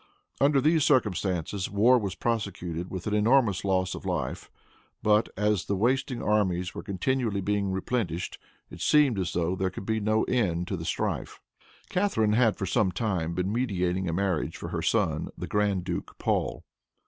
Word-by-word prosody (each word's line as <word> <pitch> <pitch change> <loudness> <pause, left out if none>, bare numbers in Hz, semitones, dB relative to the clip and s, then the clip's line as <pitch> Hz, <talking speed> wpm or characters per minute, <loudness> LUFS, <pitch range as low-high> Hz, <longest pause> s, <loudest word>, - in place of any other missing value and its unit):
Under 140 0 +4
these 155 +2 +3
circumstances 100 - +1
war 115 +6 +4
was 100 -4 -3
prosecuted 95 -7 -3
with 95 -2 -6
an 105 - -1
enormous 105 -2 +3
loss 95 -2 +1
of - - -7
life; - - -3 0.5
but 105 0 +3
as 105 -2 +1
the 100 - -1
wasting 125 +4 0
armies 90 -4 +1
were - - -6
continually 110 +2 -1
being 100 0 0
replenished, 95 -3 -2 0.3
it - - -10
seemed 145 -8 +4
as 90 -2 -2
though 85 +1 0
there 95 0 0
could 95 - -8
be 110 +1 0
no 110 +1 +1
end 90 -8 0
to 95 - -1
the 80 -2 -6
strife. - - -2 0.5
Catharine 180 - +2
had 115 -1 +3
for 95 - -3
some 95 0 +1
time 90 -5 -2
been 90 +3 -1
meditating 95 -6 0
a - - -2
marriage 95 -3 -1
for - - -6
her - - -3
son, - - 0
the - - -4
Grand 100 -3 0
Duke 90 -1 -5
Paul. - - -1
100 Hz, 170 wpm, -27 LUFS, 90-115 Hz, 0.5 s, Under